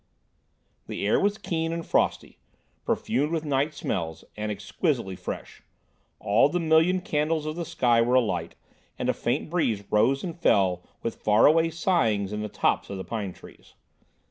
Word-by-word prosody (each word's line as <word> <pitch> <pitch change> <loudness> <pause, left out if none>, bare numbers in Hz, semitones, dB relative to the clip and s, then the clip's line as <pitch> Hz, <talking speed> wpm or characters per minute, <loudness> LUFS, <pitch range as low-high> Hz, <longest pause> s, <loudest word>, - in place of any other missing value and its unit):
The - - -4
air 105 - +3
was 205 +1 +1
keen 165 -5 -2
and 165 0 -4
frosty, - - 0 0.5
perfumed 140 +7 0
with 160 -2 -2
night 145 +2 0
smells, 80 -2 -3
and 105 0 -3
exquisitely 100 - -2
fresh; - - -7 0.6
all 105 +7 +3
the 175 - -1
million 165 +3 +3
candles 155 -1 -1
of 155 0 -3
the 170 0 -4
sky 120 -5 +2
were 120 +2 +2
alight, 90 -9 0 0.4
and - - -2
a - - +3
faint - - -2
breeze 115 - 0
rose 120 +6 +3
and 170 -4 -4
fell 95 - +2 0.2
with 115 - -4
far 105 +1 +4
away 165 +2 +5
sighings 115 - +1
in 105 - -3
the 105 - -4
tops - - 0
of 100 - -5
the 95 - -5
pine 105 -5 -4
trees. - - -16
130 Hz, 170 wpm, -26 LUFS, 105-165 Hz, 0.6 s, away